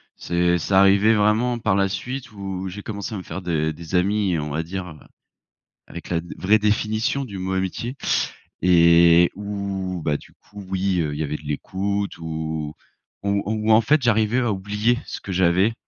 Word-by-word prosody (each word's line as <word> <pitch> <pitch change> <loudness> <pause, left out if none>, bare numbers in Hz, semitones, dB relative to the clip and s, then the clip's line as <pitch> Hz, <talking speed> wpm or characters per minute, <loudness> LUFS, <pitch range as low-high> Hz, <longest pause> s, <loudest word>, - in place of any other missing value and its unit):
C'est 85 0 +1
c'est 95 - -3
arrivé 100 +3 +5
vraiment 110 +3 +2
par 95 - +1
la 100 0 +3
suite 125 +7 -5
où 95 -2 -5
j'ai 100 +3 -7
commencé 100 +1 -5
à - - -3
me - - -6
faire 90 +3 -7
des 80 -2 0
des 85 +3 -11
amis, 95 -1 +1
on 75 0 -4
va 80 +3 -2
dire, 90 +2 -5
heu, 80 -3 -11 0.9
avec 85 - -9
la 85 -1 +1
dé 85 - -9
la - - -7
vraie 110 +2 +5
définition 110 +5 0
du 100 -6 -7
mot 95 +1 -3
amitié 95 +7 -2 0.7
et 85 -1 +6
où 100 -3 -4
bah, 75 -1 0
du - - -17
coup 105 -1 -13
oui, 95 -1 0
heu, 75 -2 -2
il 75 - -6
y - - 0
avait 75 +1 -3
de - - -16
l'écoute 100 +7 -3
ou 80 -1 -4 0.5
ou 100 0 0
ou 110 +1 0
en 110 - +7
fait 150 +6 +3
j'arrivais 115 0 +2
à 120 -3 +1
oublier 105 +5 0
ce - - -7
que 95 - -7
j'avais 95 +4 +3
95 Hz, 195 wpm, -22 LUFS, 85-105 Hz, 0.9 s, en